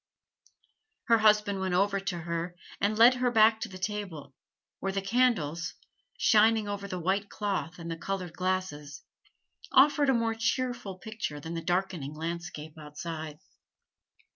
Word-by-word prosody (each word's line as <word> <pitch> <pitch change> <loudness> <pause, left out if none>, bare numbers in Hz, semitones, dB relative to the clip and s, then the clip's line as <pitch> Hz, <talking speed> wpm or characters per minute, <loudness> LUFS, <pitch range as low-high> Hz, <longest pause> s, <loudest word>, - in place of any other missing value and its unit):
Her 230 -1 +6
husband 210 -2 +4
went 190 -1 -1
over 200 +1 +2
to 190 -2 -3
her 170 +1 -3 0.2
and 210 +2 +1
led 235 +3 +8
her 250 0 +1
back 220 -1 +5
to 230 - -3
the 185 - -9
table, 185 -8 -5 0.5
where 195 - -2
the 195 - -1
candles, 195 -7 +1 0.4
shining 220 -1 +4
over 200 -1 -4
the 185 -2 -4
white 195 +4 0
cloth 195 -4 -3
and 170 -1 -6
the 165 - -4
colored 180 -1 -4
glasses, 180 -7 -3 0.7
offered 290 +1 +5
a 265 - +4
more 230 -1 +1
cheerful 225 -2 -2
picture 210 -7 -5
than 160 +3 -6
the 165 - -3
darkening 175 -5 -2
landscape 160 -1 -6
outside. 155 0 -6
190 Hz, 145 wpm, -29 LUFS, 170-220 Hz, 0.7 s, led